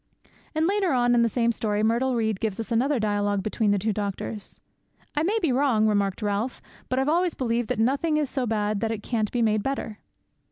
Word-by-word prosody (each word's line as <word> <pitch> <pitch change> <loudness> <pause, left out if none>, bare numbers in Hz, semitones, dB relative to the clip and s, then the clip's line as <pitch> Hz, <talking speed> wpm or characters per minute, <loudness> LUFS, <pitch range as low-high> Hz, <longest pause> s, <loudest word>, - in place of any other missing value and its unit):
"' - - -32
And 315 +1 +2
later 390 -3 +1
on 245 -1 +3
in 240 - +4
the 230 - +3
same 235 +1 +1
story 210 -2 -1
Myrtle 240 +4 +2
Reed 220 -4 0
gives 220 -3 -2
us 225 +2 -5
another 255 +4 +2
dialogue 205 -2 0
between 215 +1 0
the 205 - +3
two 210 +3 0
doctors. 205 0 -5 0.6
'"I 295 - +1
may 395 +8 +1
be 315 - +2
wrong," 250 -4 +2
remarked 205 -1 +1
Ralph, 210 +5 -1 0.3
"but 255 - 0
I've 265 +1 +1
always 345 +2 +2
believed 235 -2 -1
that - - 0
nothing 280 +7 +1
is 300 -2 +1
so 260 -1 -2
bad 210 -1 0
that 225 - -1
it 220 -2 -4
can't 220 -4 -1
be 240 -1 +1
made 215 -1 +2
better." 245 -4 -4
230 Hz, 225 wpm, -25 LUFS, 210-265 Hz, 0.6 s, in